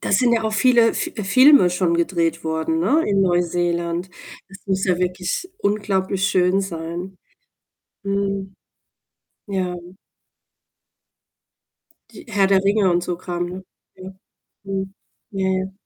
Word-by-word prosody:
da - - -3
sind 235 +4 +3
ja 230 -1 +2
auch 220 0 -2
viele 235 +1 +4
F - - -3 0.2
Filme 260 -4 +6
schon 180 -1 0
gedreht 170 -1 0
worden, 160 0 -1
ne, 275 - +2
in 200 -1 +1
Neuseeland. 175 -1 0 0.4
Das 195 0 -12
muss 190 -1 0
ja 180 -2 +1
wirklich 180 - -2
unglaublich 195 -2 0
schön 185 +1 +2
sein. 175 0 -6 0.9
Mhm, 195 -1 -2 0.9
ja. 185 -3 -2 2.4
Die - - -12
Herr 200 -3 +2
der 195 -1 +3
Ringe 200 -1 +3
und 175 0 +1
so 180 - -3
Kram, 175 0 -4
ne, 185 +2 -8 0.3
ja 185 0 -9 0.5
mhm, 195 -1 -4 0.4
ja, 195 -1 -1
ja. 190 0 -1
190 Hz, 130 wpm, -21 LUFS, 175-200 Hz, 2.4 s, Filme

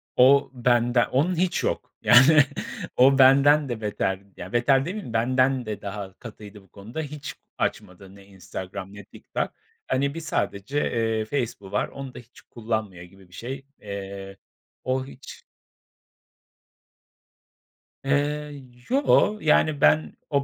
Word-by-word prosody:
O 140 +2 +5
bende 120 0 +2
onun 160 +8 +1
hiç 180 +1 0
yok - - -2
yani, 135 +4 +7 0.5
o 135 +2 +6
benden 140 +2 +6
de 115 -2 -4
beter, 100 -2 -1 0.2
ya 90 +4 -9
beter 135 +3 +3
demeyeyim, 185 - -6
benden 130 +2 +2
de 105 -2 -5
daha 100 -1 -6
katıydı 105 -3 -11
bu 95 - -24
konuda. 110 +10 -7
Hiç 150 -1 -7 0.2
açmadı 95 +1 -4
ne 100 - -16
Instagram 95 0 -8
ne 105 -1 -11
TikTok. - - -5 0.4
Hani 140 +2 0
bir 165 - -5
sadece, 135 -4 -2
eee, 115 -2 0
Facebook'u 110 -6 -4
var, 105 - 0
onu 135 -2 -9
da - - -9
hiç 120 0 -17
kullanmıyor 110 -6 -4
gibi 95 +1 -17
bir - - -21
şey, 135 +5 -7 0.2
eee. 100 -1 -7 0.5
O 130 +1 -1
hiç 135 0 -12 2.6
Eee, 145 0 -1 0.3
yoo, 260 -5 +3
yani, 155 -1 +2
ben, 75 0 +3 0.2
o 140 -1 +1
120 Hz, 135 wpm, -25 LUFS, 100-140 Hz, 2.6 s, yani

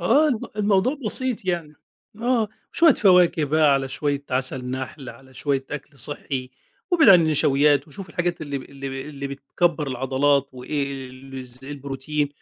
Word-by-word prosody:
آه، 280 - +4
الم 240 -6 0 0.2
الموضوع 210 +7 +2
بسيط 250 -2 0
يعني، 170 -4 -2 0.5
آه، 235 -3 +1 0.2
شوية 330 -5 +6
فواكه 180 -5 +4
بقى، 150 0 +4
على 135 -1 -1
شوية 140 +1 -2
عسل 130 0 -1
نحل، 130 +1 -5
على 130 -1 -13
شوية 135 -1 -1
أكْل 145 -1 -7
صحي، 135 -3 -4 0.4
وابعد 335 - +5
عن 180 -3 +9
النشويات، 145 -2 +3
وشوف 185 +6 -9
الحاجات 175 -1 -2
اللي 145 -2 -4
اللي 135 0 -6
اللي 140 -1 -6
بتكبَّر 150 +3 -1
العضلات، 135 +2 +1
وإيه 135 0 -4
ال 130 0 -9
ز 125 +2 -14
البروتين، 140 +1 -3
145 Hz, 150 wpm, -23 LUFS, 135-175 Hz, 0.5 s, عن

